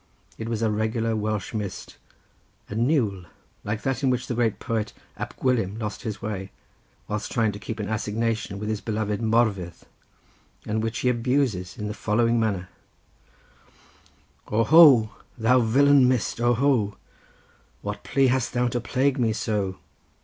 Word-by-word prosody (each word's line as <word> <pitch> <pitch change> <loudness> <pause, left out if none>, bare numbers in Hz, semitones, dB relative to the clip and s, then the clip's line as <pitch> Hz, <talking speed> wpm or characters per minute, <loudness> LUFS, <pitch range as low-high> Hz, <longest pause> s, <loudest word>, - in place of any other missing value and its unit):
It 110 0 -4
was 115 -1 -2
a 110 - +2
regular 110 +1 0
Welsh 105 -1 -2
mist, 105 -3 -5 0.7
a - - -3
niwl, 110 - 0 0.4
like 105 +1 -3
that 135 -3 -1
in 135 - +2
which 125 0 0
the - - -3
great 115 -3 +1
poet 110 -2 -3 0.2
Ab - - -6
Gwilym 115 -5 0
lost 105 -2 -4
his 110 -3 -5
way, 95 -3 -4 0.6
whilst 105 0 -4
trying 115 -3 +1
to 100 - -8
keep 110 +3 -6
an 105 - -3
assignation 110 -1 -2
with 105 +1 -5
his 110 -1 -2
beloved 105 -1 -2
Morfydd, 110 -6 0 0.8
and 110 +1 -1
which 115 +2 -2
he 125 - +2
abuses 120 -6 0
in 105 - -4
the 105 - -3
following 115 +2 +1
manner:— 100 -5 -1 1.8
"O 110 +2 +2
ho! 135 -8 +7 0.3
thou 120 +3 +4
villain 135 +3 +5
mist, 125 -2 0
O 120 0 +3
ho! 120 -6 +1 0.9
What - - -5
plea 135 - +2
hast 130 -1 +1
thou 125 0 +1
to 120 0 -2
plague 135 +3 0
me 115 -3 +2
so! 100 -4 -2
110 Hz, 155 wpm, -25 LUFS, 105-120 Hz, 1.8 s, ho